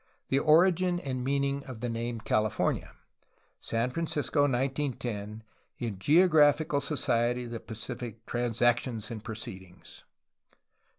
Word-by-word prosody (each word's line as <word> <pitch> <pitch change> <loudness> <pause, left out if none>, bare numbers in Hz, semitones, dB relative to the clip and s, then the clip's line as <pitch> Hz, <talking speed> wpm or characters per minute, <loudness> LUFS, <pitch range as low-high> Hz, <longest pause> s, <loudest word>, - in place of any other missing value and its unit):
The 135 - +3
origin 175 +3 +4
and 130 -5 -4
the - - -4
meaning 140 +1 0
of 130 -4 -8
the 120 - -2
nams 115 0 -3
California 110 -1 0 0.6
(San 115 +2 -1
Francisco. 145 -2 0
1910), 120 -5 -2 0.3
in 110 -6 -4
Geographical 150 - +4
so 140 +2 -3
ciety 120 -1 +1
of 120 - -8
the 115 - -4
Pacific, 115 0 -7
Transac 120 0 +2
tions 115 -4 -5
and 110 -2 -6
proceedings^ 95 -6 -9 0.5
v. - - -31
125 Hz, 130 wpm, -29 LUFS, 115-140 Hz, 0.6 s, origin